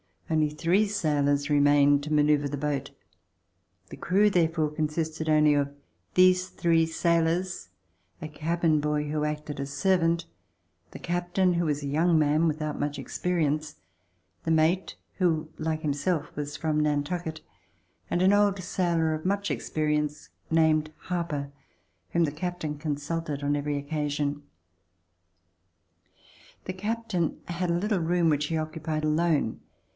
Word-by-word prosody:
Only 155 -1 +2
three 175 +7 +2
sailors 145 -7 +1
remained 145 0 +4
to 155 +1 -3
manoeuvre 150 -1 +3
the 145 +1 -4
boat. 145 -1 -2 1.0
The - - -9
crew 200 +5 +3
therefore 165 -4 +1
consisted 155 +1 -2
only 150 -1 +5
of 140 0 0 0.4
these 185 0 +5
three 165 -3 +2
sailors, 170 +2 0 0.5
a 155 - -5
cabin 160 +1 +1
boy 150 0 -1
who 150 0 0
acted 150 -1 -4
as 140 0 -4
servant, 170 +1 +2 0.7
the - - -9
cap 175 0 -3
tain, 185 -2 +3
who 170 0 +1
was 150 -1 -1
a - - -3
young 160 +4 +3
man 155 +2 +3
without 155 -1 -2
much 145 -1 -2
experience, 155 +1 -1 0.7
the - - -3
mate, 160 +4 +2 0.2
who 160 -4 +1
like 155 0 -2
himself 155 +2 -1
was 145 0 -4
from 155 0 0
Nantucket, 155 +2 -1 0.7
and 175 - 0
an 190 +2 +5
old 205 -1 +3
sailor 170 -3 0
of 155 +1 -5
much 200 +1 0
experience 150 -1 -2 0.2
named 155 -1 +3
Harper 165 -6 -3 0.6
whom 170 - +2
the 150 - +1
captain 155 -1 -4
consulted 150 0 -3
on 145 +1 +1
every 145 0 -1
occasion. 145 0 -2 2.2
The 185 - -3
captain 205 -3 -2
had 175 +1 -2
a - - +2
little 205 +1 0
room 170 0 +2
which 150 -1 +1
he 160 +2 -1
occupied 155 0 -3
alone. 155 -5 +1
155 Hz, 140 wpm, -27 LUFS, 150-170 Hz, 2.2 s, only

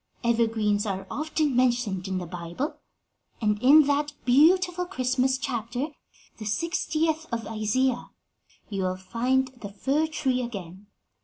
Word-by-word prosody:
Evergreens 225 -3 +1
are 195 -1 -3
often 305 -2 0
mentioned 240 -7 +1
in 190 -1 -2
the 180 - -4
Bible, 175 - -5 0.6
and 210 -2 0
in 295 +4 +8
that 290 +1 0
beautiful 355 +7 +4
Christmas 260 -4 +1
chapter, 250 +1 -3 0.5
the 215 - -7
sixtieth 320 +5 0
of 230 -1 -2
Isaiah, 235 +4 0 0.6
you 200 -2 -3
will 185 0 -1
find 250 +7 0
the 240 -5 -9
fir 275 +10 0
tree 270 -5 0
again. 200 -5 -7
245 Hz, 130 wpm, -26 LUFS, 210-290 Hz, 0.6 s, in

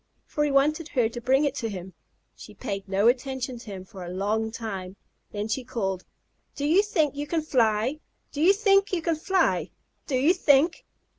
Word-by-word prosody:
for 295 - -1
he 295 - +1
wanted 295 +3 +2
her 245 -8 +1
to 240 +1 -7
bring 265 +4 +3
it 280 - 0
to 240 -5 -3
him. 190 -2 -7 0.4
She - - -12
paid 195 0 -5
no 200 +3 +3
attention 255 0 0
to - - -13
him 190 -2 -7
for 185 0 -10
a 175 - -7
long 210 +4 -1
time. 195 -5 -6 0.4
Then 205 0 -3
she 250 +4 -2
called: 195 -7 -3 0.5
"Do 285 - -3
you 335 +7 +5
think 320 -9 0
you 290 +1 -4
can 320 0 -1
fly? 240 0 +1 0.3
Do 290 - -4
you 350 +4 +7
think 395 -1 +3
you 350 -3 -1
can 330 -1 +1
fly? 370 +5 +1 0.4
Do 275 - -1
you 280 +7 +4
think?" 320 -2 +3
260 Hz, 200 wpm, -26 LUFS, 210-305 Hz, 0.5 s, you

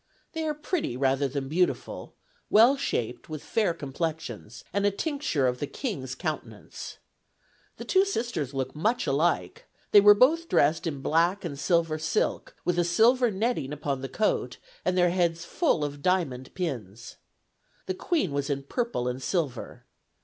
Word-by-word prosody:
They 320 -1 -2
are 300 - -1
pretty, 300 - -2
rather 135 +1 +2
than 135 0 -4
beautiful, 175 +5 -1 0.3
well 235 +6 +6
shaped, 125 - -3
with 155 -2 -6
fair 215 -5 +1
complexions, 145 -7 -5
and 200 +1 +1
a 205 - +4
tincture 275 - -1
of 125 0 0
the 145 - -2
King's 135 - -4
countenance. - - -6 0.8
The - - -7
two 380 0 +4
sisters 235 - -2
look 135 -1 -3
much 220 +11 0
alike; 175 - 0 0.2
they 205 - +9
were 205 0 +8
both 320 +9 +3
dressed 160 +3 +3
in 140 -4 -4
black 175 +5 +2
and 140 -4 -5
silver 165 -2 +1
silk, 475 - -1
with 175 0 +1
a - - +4
silver 230 +8 +4
netting 205 - -1
upon 140 -2 -3
the 135 - -5
coat, 215 - 0 0.3
and 180 - 0
their 175 -1 +4
heads 170 -2 0
full 275 - +1
of 145 -1 -4
diamond 140 -8 0
pins. 120 - -5 0.7
The 185 - -2
Queen 295 - -1
was 140 0 -2
in 140 -1 -1
purple 230 - -2
and 125 +1 -3
silver. 145 -5 -3
170 Hz, 160 wpm, -27 LUFS, 140-220 Hz, 0.8 s, they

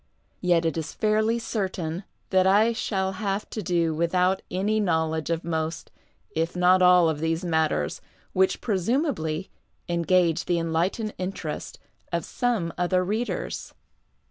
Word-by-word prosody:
Yet 175 -2 +2
it 165 - 0
is 160 -1 -4
fairly 215 +1 +2
certain 190 -6 -3 0.3
that 190 -1 +4
I 215 +4 +4
shall 190 -4 -1
have 200 0 -1
to 215 - -3
do 170 -3 +1
without 180 +4 +1
any 205 +4 0
knowledge 160 -5 0
of 165 0 -1
most, 160 0 -3 0.4
if 165 +2 -1
not 180 +1 +4
all, 180 -1 +6
of 155 -2 -1
these 165 +2 -1
matters 160 - 0 0.3
which 190 0 +2
presumably 195 - -1 0.4
engage 170 -1 +2
the 175 -1 +1
enlightened 170 +7 -1
interest 180 -5 -4 0.3
of 170 -1 -1
some 225 -9 -1
other 180 +1 +2
readers. 215 +6 -3
180 Hz, 135 wpm, -26 LUFS, 165-195 Hz, 0.4 s, all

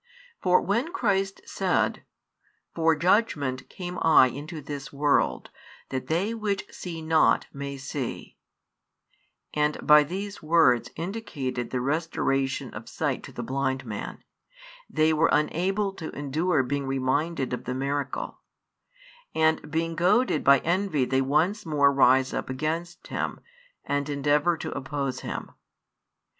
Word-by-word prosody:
For 180 -1 +4
when 235 - 0
Christ 195 - 0
said: - - 0 0.7
For 165 -1 +3
judgment 150 - +1
came 180 -1 -6
I 155 -5 +6
into 150 +6 -7
this 140 -1 -7
world, 145 0 +1 0.4
that 130 -1 -4
they 180 +9 0
which 210 -3 -2
see 165 -3 -6
not 160 0 +3
may 140 -1 -5
see, 135 -1 -5 1.2
and 150 0 +1
by 150 0 +8
these 195 +7 -5
words 155 -7 +4
indicated 165 - -4
the 125 - -2
restoration 135 -2 -1
of - - -8
sight - - -2
to - - -10
the - - -6
blind 130 -1 -1
man, 105 -3 -6 0.7
they 155 +1 +3
were 160 +1 +3
unable 195 +6 +1
to 165 -4 -7
endure 150 +2 +1
being 140 +1 -2
reminded 135 +2 0
of 125 - -4
the 125 - -3
miracle, 140 - -3 1.0
and 160 -1 +2
being 165 +1 -1
goaded 200 +10 +2
by 140 -1 +6
envy 170 -5 +1
they 130 +1 +1
once 160 +10 +1
more 145 -3 +3
rise 130 -1 +4
up - - -3
against 160 +6 -3
Him, - - -3 0.5
and 145 0 -1
endeavour 145 +4 +2
to - - -5
oppose 140 -1 -3
Him. - - -6
150 Hz, 130 wpm, -26 LUFS, 135-175 Hz, 1.2 s, by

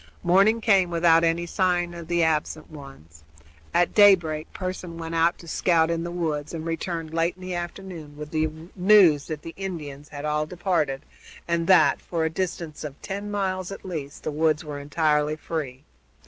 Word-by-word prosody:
Morning 195 +6 +4
came, 195 -5 +4
without 165 -1 +4
any 165 +1 +1
signs 175 -1 0
of 170 -2 -8
the 170 -1 +2
absent 155 0 -1
ones. 135 - -13 0.5
At 175 0 +2
daybreak 175 -7 +4
Pearson 185 -2 -5
went 165 0 -6
out 165 +1 +2
to 170 - -14
scout 165 -1 +2
in 165 0 -1
the 170 - -4
woods, 160 -3 -3
and 160 0 -5
returned 165 -1 -4
late 165 +1 +1
in 185 - -14
the 185 0 -4
afternoon 175 -4 -7
with 150 0 -8
the 155 0 +1 0.3
news 180 -6 +5
that 155 -2 -5
the 165 - -8
Indians 150 -7 -6
had 145 0 -7
all 150 0 0
departed, 160 -6 -1 0.4
and 170 0 0
that, 185 -2 +5
for 165 -2 -2
a 160 - -1
distance 170 -3 -4
of 145 -2 -7
ten 200 +1 -5
miles 190 -2 -2
at 195 - -9
least, 150 -6 -6
the - - -2
woods 155 +1 +1
were 145 -1 -6
entirely 150 +1 +1
free. 150 -5 -5
165 Hz, 180 wpm, -25 LUFS, 150-180 Hz, 0.5 s, news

